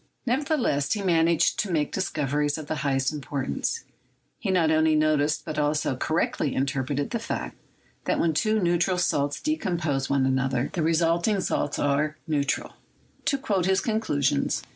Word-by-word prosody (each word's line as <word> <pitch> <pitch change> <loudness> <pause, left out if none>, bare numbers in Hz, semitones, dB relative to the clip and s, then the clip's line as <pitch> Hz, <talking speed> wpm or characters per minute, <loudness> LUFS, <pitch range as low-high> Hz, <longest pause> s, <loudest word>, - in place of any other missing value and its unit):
Nevertheless, 255 - +1
he 205 -2 -3
managed 165 -3 +3
to 210 - 0
make 150 -3 0
discoveries 150 -5 -1
of 155 - -6
the 155 +1 -3
highest 135 -1 0
importance. 145 - -3 0.6
He 205 - -3
not 170 -4 +3
only 160 0 +3
noticed, 150 -1 +1
but 155 -1 -3
also 150 -2 +1
cor 155 +5 -1
rectly 145 -5 0
interpreted 140 +1 -1
the 235 - -1
fact, 230 - -4 0.5
that - - 0
when 165 -1 +2
two 215 +7 +2
neutral 175 0 +1
salts 145 -5 0
decompose 170 - -1
one 140 -1 +2
another, 130 -1 0
the 170 - -1
resulting 165 +5 +2
salts 145 -5 -1
are 150 +2 0
still 160 - -4
neu 145 - +3
17$ 140 - -1
CHEMISTRY - - 0
tral. - - -22 0.5
To 280 - +2
quote 205 -9 0
his 190 0 +3
conclusions 150 - 0
155 Hz, 170 wpm, -26 LUFS, 145-185 Hz, 0.6 s, managed